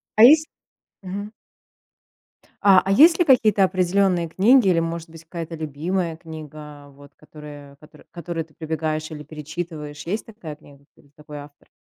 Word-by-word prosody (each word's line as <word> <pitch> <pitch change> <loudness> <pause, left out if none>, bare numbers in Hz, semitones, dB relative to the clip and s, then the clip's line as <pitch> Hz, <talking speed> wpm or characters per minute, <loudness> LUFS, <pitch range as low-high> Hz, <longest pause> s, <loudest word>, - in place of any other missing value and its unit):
А 215 - +6
есть 310 +5 +7 0.5
Мгм. 200 +2 -6 1.3
А, 195 -2 +6
а 195 - 0
есть 325 - +6
ли 350 - +4
какие-то 220 -8 +4
определённые 185 -2 +1
книги 225 +5 +4
или, 170 -2 +3
может 165 0 -4
быть, 165 0 -13
какая-то 165 0 -7
любимая 160 +3 -3
книга, 150 -3 -11
вот 140 +1 -17
которая 145 -2 -13
котор 150 - -18
которую 170 -2 -5
ты 155 - -27
прибегаешь 155 -1 -3
или 150 -1 -8
перечитываешь, 155 -1 -7
есть 210 +5 -3
такая 175 -9 -10
книга 140 -1 -19
или 140 - -24
такой 150 -1 -11
автор? 145 0 -15
165 Hz, 150 wpm, -22 LUFS, 150-190 Hz, 1.3 s, есть